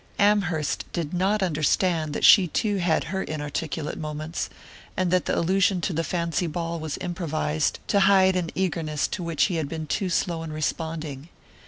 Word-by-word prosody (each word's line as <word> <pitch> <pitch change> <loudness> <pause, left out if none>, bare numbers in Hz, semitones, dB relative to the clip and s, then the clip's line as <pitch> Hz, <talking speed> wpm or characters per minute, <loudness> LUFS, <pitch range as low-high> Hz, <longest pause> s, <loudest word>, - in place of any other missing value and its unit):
Amherst 185 -7 +1
did 165 -2 -3
not 195 +3 +1
understand 155 -1 +1
that - - +1
she 190 -4 +8
too 205 +5 0
had 170 -3 +1
her 190 +3 -3
inarticulate 150 0 -4
moments, 155 +1 -4 0.5
and 185 -2 +1
that 185 -1 +2
the - - 0
allusion 190 +2 +2
to 175 - -1
the 165 +1 0
fancy 170 0 -1
ball 165 +1 -3
was 155 -2 -4
improvised 160 -4 -1
to 200 - +4
hide 190 -1 +5
an 175 -3 -1
eagerness 165 -5 -1
to - - -4
which 170 -3 0
he 180 -5 +1
had 155 -3 -2
been 160 -1 -4
too 185 +5 -1
slow 170 -1 0
in 165 -1 -6
responding. 155 -1 -4
170 Hz, 175 wpm, -25 LUFS, 155-185 Hz, 0.5 s, she